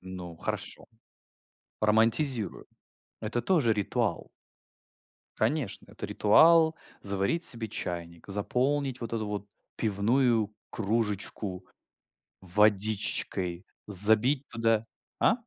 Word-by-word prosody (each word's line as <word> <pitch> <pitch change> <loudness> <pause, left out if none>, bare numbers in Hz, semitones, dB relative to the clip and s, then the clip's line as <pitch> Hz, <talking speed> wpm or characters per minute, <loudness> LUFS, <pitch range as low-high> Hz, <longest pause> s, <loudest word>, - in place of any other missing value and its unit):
Ну, 90 -2 -9
хорошо. - - -5 0.9
Романтизирую. 115 +2 +2 0.5
Это 115 +2 -3
тоже 145 -8 +2
ритуал! 105 -2 -2 1.1
Конечно, 120 0 -2
это - - -7
ритуал- 160 +9 +4 0.3
заварить 100 - 0
себе 115 -6 +4
чайник, 85 -4 -6
заполнить 130 +6 -2
вот 115 -1 -5
эту 110 -2 -2
вот 105 0 -5 0.3
пивную 110 +1 +1 0.2
кружечку 105 -3 -3 0.8
водичкой, 95 -2 0 0.2
забить 110 +8 +5
туда 115 -1 0 0.3
А? - - +4
110 Hz, 85 wpm, -28 LUFS, 100-120 Hz, 1.1 s, забить